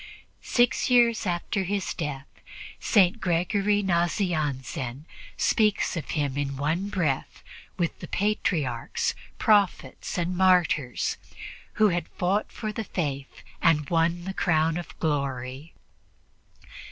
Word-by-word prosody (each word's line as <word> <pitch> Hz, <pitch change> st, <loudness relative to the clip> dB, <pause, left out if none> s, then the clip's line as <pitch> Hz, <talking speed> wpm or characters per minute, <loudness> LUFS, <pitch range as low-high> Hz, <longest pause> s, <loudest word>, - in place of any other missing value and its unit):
Six 240 Hz, +1 st, +2 dB
years 235 Hz, -3 st, +4 dB
after 175 Hz, +2 st, -1 dB
his 195 Hz, +1 st, -2 dB
death, 145 Hz, -5 st, -4 dB, 0.5 s
St. 205 Hz, +1 st, +3 dB
Gregory 195 Hz, +4 st, +1 dB
Nazianzen 155 Hz, -, -1 dB, 0.3 s
speaks 215 Hz, -4 st, +2 dB
of 165 Hz, -, -5 dB
him 145 Hz, -2 st, -1 dB
in 140 Hz, -1 st, -2 dB
one 165 Hz, +8 st, -1 dB
breath 165 Hz, -10 st, -2 dB, 0.3 s
with 170 Hz, -2 st, -1 dB
the -, -, -8 dB
patriarchs, 165 Hz, -, -1 dB, 0.2 s
prophets 205 Hz, -, +1 dB
and 175 Hz, +1 st, -1 dB
martyrs 180 Hz, -8 st, +2 dB, 0.6 s
who 215 Hz, -1 st, +4 dB
had 175 Hz, -1 st, -1 dB
fought 195 Hz, +4 st, -1 dB
for 215 Hz, -1 st, -4 dB
the 225 Hz, -, -3 dB
Faith 140 Hz, -8 st, -4 dB, 0.2 s
and 150 Hz, -2 st, +3 dB
won 170 Hz, +1 st, +2 dB
the 190 Hz, +2 st, -4 dB
crown 160 Hz, -3 st, +2 dB
of 175 Hz, -, -8 dB
glory. 140 Hz, -1 st, -2 dB
175 Hz, 115 wpm, -26 LUFS, 145-195 Hz, 0.6 s, years